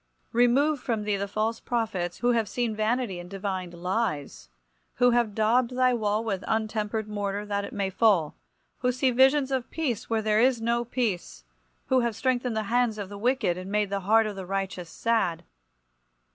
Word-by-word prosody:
Remove 265 Hz, +5 st, +3 dB
from 230 Hz, -4 st, -2 dB
thee 210 Hz, -1 st, 0 dB
the 200 Hz, 0 st, -2 dB
false 215 Hz, +3 st, -1 dB
prophets, 210 Hz, -7 st, -2 dB
who 245 Hz, 0 st, +2 dB
have 225 Hz, -4 st, +1 dB
seen 235 Hz, 0 st, -1 dB
vanity 220 Hz, -3 st, -1 dB
and 175 Hz, 0 st, -9 dB
divined 190 Hz, -3 st, -4 dB
lies; 180 Hz, -, -3 dB, 0.5 s
who 245 Hz, 0 st, +4 dB
have 235 Hz, -4 st, +1 dB
daubed 235 Hz, +3 st, +2 dB
thy 255 Hz, -1 st, +4 dB
wall 215 Hz, -1 st, 0 dB
with 200 Hz, -4 st, -2 dB
untempered 220 Hz, -1 st, -1 dB
mortar, 205 Hz, -1 st, -3 dB
that 200 Hz, -1 st, -2 dB
it 200 Hz, -, -6 dB
may 200 Hz, -5 st, -1 dB
fall; 185 Hz, -7 st, +3 dB, 0.4 s
who 250 Hz, 0 st, +1 dB
see 255 Hz, +1 st, +1 dB
visions 265 Hz, +2 st, +4 dB
of 260 Hz, -2 st, -1 dB
peace 275 Hz, -9 st, -3 dB
where 225 Hz, -1 st, 0 dB
there 215 Hz, 0 st, +3 dB
is 255 Hz, -1 st, +3 dB
no 235 Hz, +1 st, 0 dB
peace; 205 Hz, -, -3 dB, 0.4 s
who 260 Hz, -, +3 dB
have 235 Hz, -3 st, 0 dB
strengthened 245 Hz, -1 st, 0 dB
the 220 Hz, -, 0 dB
hands 235 Hz, 0 st, +1 dB
of 200 Hz, -2 st, -5 dB
the 205 Hz, -, -8 dB
wicked, 230 Hz, -7 st, +1 dB
and 185 Hz, +2 st, -7 dB
made 210 Hz, -1 st, 0 dB
the 200 Hz, -, 0 dB
heart 220 Hz, +4 st, +4 dB
of 210 Hz, -1 st, -4 dB
the 190 Hz, -2 st, -7 dB
righteous 190 Hz, -3 st, -3 dB
sad. 180 Hz, -8 st, 0 dB
220 Hz, 185 wpm, -27 LUFS, 200-240 Hz, 0.5 s, who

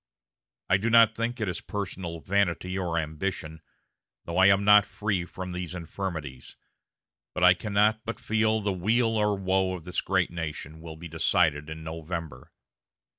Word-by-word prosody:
I 95 Hz, -, +4 dB
do 110 Hz, +5 st, -1 dB
not 115 Hz, -1 st, +6 dB
think 115 Hz, +2 st, -3 dB
it 110 Hz, -, -1 dB
is 90 Hz, -, -3 dB
personal 90 Hz, -5 st, -5 dB
vanity 95 Hz, -1 st, 0 dB
or 90 Hz, -3 st, -1 dB
ambition, 80 Hz, 0 st, -3 dB, 0.6 s
though 85 Hz, +2 st, -2 dB
I 95 Hz, -, +7 dB
am 100 Hz, 0 st, +4 dB
not 105 Hz, 0 st, +7 dB
free 100 Hz, -4 st, -2 dB
from 90 Hz, +1 st, -7 dB
these 90 Hz, 0 st, -5 dB
infirmities, 80 Hz, -6 st, -6 dB, 0.8 s
but 90 Hz, -, -1 dB
I 90 Hz, 0 st, +8 dB
cannot 105 Hz, +3 st, +1 dB
but 115 Hz, 0 st, -5 dB
feel 110 Hz, 0 st, +1 dB
that -, -, -10 dB
the 100 Hz, -, +1 dB
weal 115 Hz, +5 st, +1 dB
or 105 Hz, -1 st, +1 dB
woe 95 Hz, -1 st, +1 dB
of 85 Hz, -, -9 dB
this 90 Hz, +2 st, -2 dB
great 95 Hz, -2 st, 0 dB
nation 80 Hz, -2 st, -6 dB
will 80 Hz, -1 st, -8 dB
be 85 Hz, +2 st, -8 dB
decided 80 Hz, -2 st, +1 dB
in 80 Hz, 0 st, -7 dB
November. 80 Hz, -4 st, -6 dB
90 Hz, 170 wpm, -27 LUFS, 80-105 Hz, 0.8 s, I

